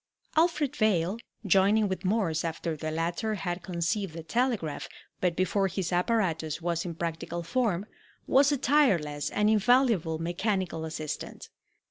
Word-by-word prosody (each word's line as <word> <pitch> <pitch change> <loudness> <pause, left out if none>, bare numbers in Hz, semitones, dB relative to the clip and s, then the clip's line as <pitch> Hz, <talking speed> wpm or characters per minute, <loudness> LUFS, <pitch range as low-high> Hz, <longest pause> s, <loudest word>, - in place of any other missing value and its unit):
Alfred 310 -4 +2
Vail, 200 -1 +2 0.3
joining 200 +3 +4
with 190 -1 -3
Morse 185 -5 +1
after 165 0 -3
the 155 +1 -4
latter 170 +7 -1
had 180 -2 -3
conceived 170 +1 -2
the 165 - -6
telegraph, 230 - -1 0.3
but 180 -2 +1
before 195 +2 +1
his 185 -1 -3
apparatus 175 -6 0
was 170 0 -1
in 170 -2 -4
practical 170 +1 -4
form, 205 -2 0 0.4
was 275 +2 +4
a 285 - +2
tireless 180 - +2
and 210 0 +1
invaluable 215 - +3
mechanical 175 0 -2
assistant. 155 -1 -6
185 Hz, 135 wpm, -28 LUFS, 165-220 Hz, 0.4 s, joining